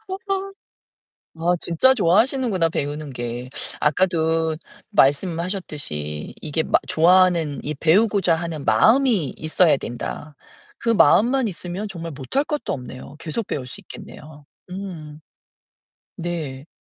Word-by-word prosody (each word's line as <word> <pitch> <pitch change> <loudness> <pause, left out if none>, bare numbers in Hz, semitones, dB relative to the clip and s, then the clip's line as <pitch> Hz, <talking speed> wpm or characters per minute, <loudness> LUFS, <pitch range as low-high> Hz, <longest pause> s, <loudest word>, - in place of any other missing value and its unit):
어 380 - -3
아. 390 0 -2 0.9
아 175 +2 +2
진짜 175 +11 +4
좋아하시는구나 220 -2 +2
배우는 145 -1 -3
게. 120 0 -5 0.3
아까도 160 0 +1 0.4
말씀하셨듯이 150 - -1
이게 155 +1 -1
마 - - +3
좋아하는 170 -3 +4
이 150 - -3
배우고자 185 +3 +3
하는 160 -3 -5
마음이 220 - +3
있어야 155 -1 +3
된다. 140 +4 -6 0.4
그 235 - -2
마음만 230 - +4
있으면 185 +2 -5
정말 170 -4 -6
못 135 - -7
할 280 - +4
것도 300 -1 -2
없네요. 130 +2 -8
계속 165 +7 -3
배울 130 -3 -4
수 - - -8
있겠네요. 150 -1 -12 0.3
음. 170 -6 -7 1.0
네. 155 -6 -5
165 Hz, 265 characters per minute, -22 LUFS, 145-195 Hz, 1.0 s, 진짜